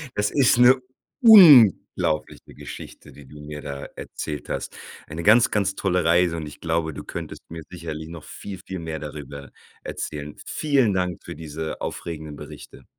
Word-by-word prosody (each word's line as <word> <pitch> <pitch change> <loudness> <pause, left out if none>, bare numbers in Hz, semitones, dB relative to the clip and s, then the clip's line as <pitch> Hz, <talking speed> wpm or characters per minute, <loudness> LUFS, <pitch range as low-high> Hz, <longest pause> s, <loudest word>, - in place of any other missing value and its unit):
Das 105 0 +1
ist 135 -3 +3
'ne 125 +1 +7 0.5
unglaubliche 145 - +6
Geschichte, - - -11
die 70 - -14
du 75 +3 -14
mir 75 0 -8
da 70 -2 -7
erzählt 75 -1 -7
hast. - - -4 0.3
Eine 80 +2 -6
ganz, 115 +4 +5
ganz 100 -2 0
tolle 90 -3 0
Reise 85 +1 +3
und 80 - -5
ich 75 - -12
glaube, 80 -2 -1
du - - -9
könntest - - -7
mir 80 -1 -8
sicherlich 80 -2 -7
noch 85 -2 -10
viel, 95 -3 -9
viel 95 -1 -7
mehr 80 -1 -5
darüber 70 -2 -9 0.3
erzählen. 75 -1 -6
Vielen 135 -9 +1
Dank 90 -2 -2
für - - -8
diese 80 0 -6
aufregenden 80 -3 -6
Berichte. - - -12
80 Hz, 160 wpm, -23 LUFS, 75-100 Hz, 0.5 s, ne